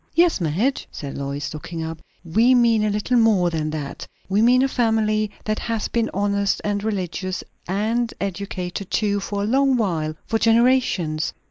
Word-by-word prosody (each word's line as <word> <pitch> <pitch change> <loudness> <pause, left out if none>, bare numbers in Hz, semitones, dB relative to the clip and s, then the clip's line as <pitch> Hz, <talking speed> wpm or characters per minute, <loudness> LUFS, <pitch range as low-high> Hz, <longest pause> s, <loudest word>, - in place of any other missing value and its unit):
"Yes, 340 - +3
Madge," 190 - 0
said 140 -2 -7
Lois, 140 +2 -4
looking 165 +2 -6
up, 160 0 -6 0.2
"we 225 +10 +4
mean 230 -3 +4
a 215 - +2
little 210 +4 0
more 205 -7 +4
than 155 -2 -1
that. 150 -3 -5 0.2
We 195 +2 +2
mean 250 +3 +5
a - - +3
family 220 -4 +1 0.2
that 215 0 -1
has 225 -2 -2
been 230 -1 0
honest 200 0 0
and 205 -1 -1
religious, 185 -3 -3 0.2
and 225 +5 0
educated 190 -1 -4
too, 205 -2 +1
for 200 0 -3
a - - 0
long 265 +3 +3
while 160 -8 -1
for 225 - 0
generations. 225 -10 +2
205 Hz, 165 wpm, -22 LUFS, 175-230 Hz, 0.2 s, mean